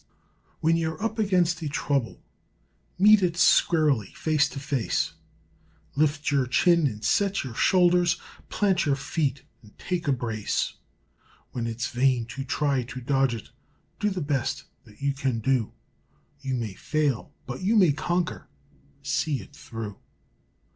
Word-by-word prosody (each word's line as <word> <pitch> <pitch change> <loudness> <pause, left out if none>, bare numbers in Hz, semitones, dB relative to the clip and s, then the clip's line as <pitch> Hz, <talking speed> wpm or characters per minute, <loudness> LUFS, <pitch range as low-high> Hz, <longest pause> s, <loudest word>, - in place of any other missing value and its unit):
When 165 +1 +3
you're 160 -1 -2
up 225 0 -2
against 180 -5 +2
a 155 - -2
trouble, 140 -4 -1 0.8
Meet 210 +2 +7
it 175 -2 0
squarely, 150 - +3
face 155 -1 +2
to 140 - -7
face; 135 -8 -1 0.8
Lift 150 +1 +1
your 135 -3 +2
chin 170 +4 +4
and 105 -4 -5
set 200 -1 +2
your 130 -4 -6
shoulders, 175 +3 +3 0.3
Plant 190 -5 +1
your 140 - +3
feet 140 -1 -2 0.2
and 105 -2 -19
take 175 -3 -3
a - - +3
brace. 115 -5 -1 0.8
When 120 -2 -3
it's 115 +1 -3
vain 125 -1 +2
to 135 - -4
try 135 0 0
to 125 +1 -7
dodge 135 -1 +1
it, 110 - -10 0.5
Do 210 - +1
the 190 -3 -3
best 140 -4 -1 0.2
that 105 +6 -16
you 140 0 +1
can 135 -3 -1
do; 120 0 0 0.7
You 135 -2 -3
may 115 -5 -3
fail, 145 +3 -1
but 125 -1 -6
you 205 +5 +2
may 185 -7 +6
conquer, 175 +4 -2 0.6
See 145 0 0
it 95 - -13
through! 110 -3 -7
140 Hz, 145 wpm, -26 LUFS, 125-170 Hz, 0.8 s, Meet